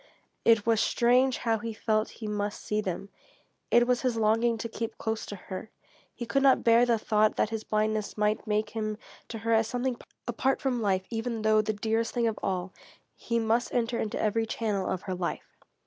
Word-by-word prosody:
It 225 -3 +4
was 225 -2 +3
strange 250 +2 +3
how 225 -2 0
he 230 0 -4
felt 215 0 0
he - - -2
must 205 0 -3
see 210 0 -1
them. 195 0 -4 0.6
It 240 0 +5
was 250 0 +1
his 250 -3 0
longing 225 +2 +2
to 225 - -4
keep 230 0 -5
close 220 0 -3
to 205 - -6
her. 190 +2 -8 0.5
He 240 - -5
could 275 +4 +1
not 270 -1 +5
bear 235 +1 +5
the 235 -1 +3
thought 215 0 +2
that 215 - 0
his 220 -1 -3
blindness 215 0 -1
might 210 +1 0
make 210 0 0
him 215 -1 -3 0.3
to 230 - -6
her 230 +1 0
as 225 0 +3
something 245 +1 -2 0.3
apart 260 +3 +1
from 255 -3 -1
life, 190 -3 +1
even 225 -1 -3
though 215 0 +4
the 215 0 -2
dearest 225 +2 -1
thing 240 -1 +2
of 225 -1 -1
all. 185 -1 -2 0.4
He 235 - -2
must 230 +2 +1
enter 235 0 0
into 215 - -2
every 225 +1 +1
channel 210 -4 -1
of 185 -1 -3
her 185 - -3
life. 180 -1 -4
225 Hz, 205 wpm, -28 LUFS, 210-235 Hz, 0.6 s, It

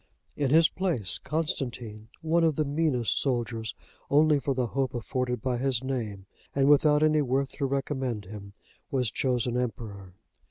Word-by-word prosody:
In 140 -2 0
his 160 +3 +6
place, 165 - 0
Constantine, 120 -8 -3 0.2
one 165 +1 +2
of 160 -3 +3
the 155 - 0
meanest 140 -5 +1
soldiers, 115 -4 -2 0.3
only 150 0 +4
for 135 0 -1
the 125 -1 +1
hope 130 +2 -2
afforded 125 +1 -2
by 125 -2 0
his 130 -1 0
name, 110 -7 -4 0.3
and 135 0 +3
without 150 +1 +5
any 155 -1 +4
worth 135 0 0
to 140 - 0
recommend 130 -5 -2
him, 100 0 -10 0.4
was 125 -5 0
chosen 125 -1 0
emperor. 100 -6 -5
130 Hz, 155 wpm, -28 LUFS, 115-145 Hz, 0.4 s, his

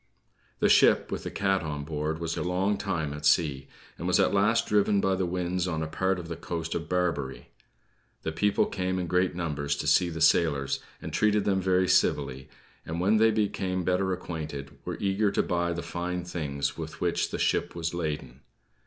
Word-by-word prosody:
The - - +3
ship, - - +5
with - - -3
the - - -2
cat 95 -1 +1
on 75 -3 -4
board, 75 +1 -2
was 85 0 -3
a - - -3
long 95 +3 +1
time 80 -7 -2
at 75 0 -8
sea; 75 -3 +2 0.3
and - - -3
was - - +3
at - - +3
last 105 +3 +3
driven 105 -1 +3
by 95 -1 +2
the 95 -1 0
winds 90 0 -1
on 80 -3 -2
a - - -3
part 95 +4 0
of 85 -2 -7
the 85 - -4
coast 85 0 -4
of 80 -1 -4
Barbary. 85 -7 -1 0.7
The 80 - -2
people 100 +6 +2
came 95 -1 -2
in 90 - -1
great 90 +1 +1
numbers 75 -4 -2
to 75 - -4
see 85 +3 +4
the 80 -1 -5
sailors, 75 -3 +3 0.2
and - - -6
treated 105 -1 +2
them 95 -2 +2
very 95 0 +2
civilly; 70 -7 +1 0.3
and, 80 +2 -4
when 100 +5 +3
they 110 +1 +5
became 95 -4 -1
better 95 +2 +1
acquainted, 75 -6 -5
were - - -4
eager 100 +1 +1
to 100 - +1
buy 85 -1 0
the 85 0 -3
fine 90 +1 -3
things 70 -5 -3
with 80 -1 -7
which - - 0
the - - -4
ship - - 0
was 85 0 -2
laden. 75 -6 -4
85 Hz, 200 wpm, -28 LUFS, 80-95 Hz, 0.7 s, ship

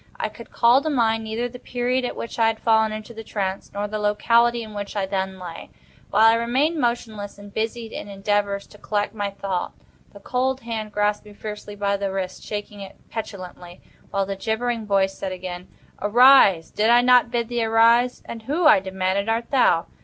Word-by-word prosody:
I - - -1
could - - -13
call 240 +3 +4
to 310 - -2
mind 225 -5 +1
neither 225 +3 -2
the 245 +1 -11
period 250 +1 -1
at - - -4
which 230 - -6
I 225 - +5
had 225 0 -1
fallen 220 -1 +3
into 215 +2 -7
the 225 0 -8
trance, 195 -3 -4
nor 205 +1 -3
the 215 +1 -4
locality 235 +3 +2
in 215 -1 -10
which 205 0 -6
I 200 -2 0
then 190 0 -3
lay. 175 -3 -9 0.4
While 220 - +4
I 225 - +7
remained 265 +8 +1
motionless, 220 -4 -2
and 205 0 -13
busied 225 +1 -3
in - - -7
endeavors 200 0 -1
to 210 - -18
collect 205 0 -2
my 205 -2 -2
thought, 195 -2 -4 0.4
the 200 - -13
cold 260 +5 -1
hand 225 -3 -5
grasped 210 0 0
me 210 - -12
fiercely 210 0 -8
by 200 0 0
the 195 -1 -2
wrist, 190 -1 -4
shaking 205 -1 -6
it 195 - -9 0.2
petulantly, 185 -5 -7 0.3
while 195 -1 0
the 195 0 -4
gibbering 225 +2 -2
voice 195 -1 +2
said 195 - -5
again: 180 -1 -6 0.3
"Arise! 210 -5 +6
did 215 +2 +1
I 240 +1 +6
not 250 -1 +5
bid 235 -1 -1
thee 240 -1 -1
arise?" 230 +2 +3
"And 230 - -7
who," 300 +9 -1
I 300 -8 +7
demanded, 190 +2 -1
"art 230 +1 -1
thou?" 210 -11 +3
215 Hz, 200 wpm, -23 LUFS, 200-235 Hz, 0.4 s, I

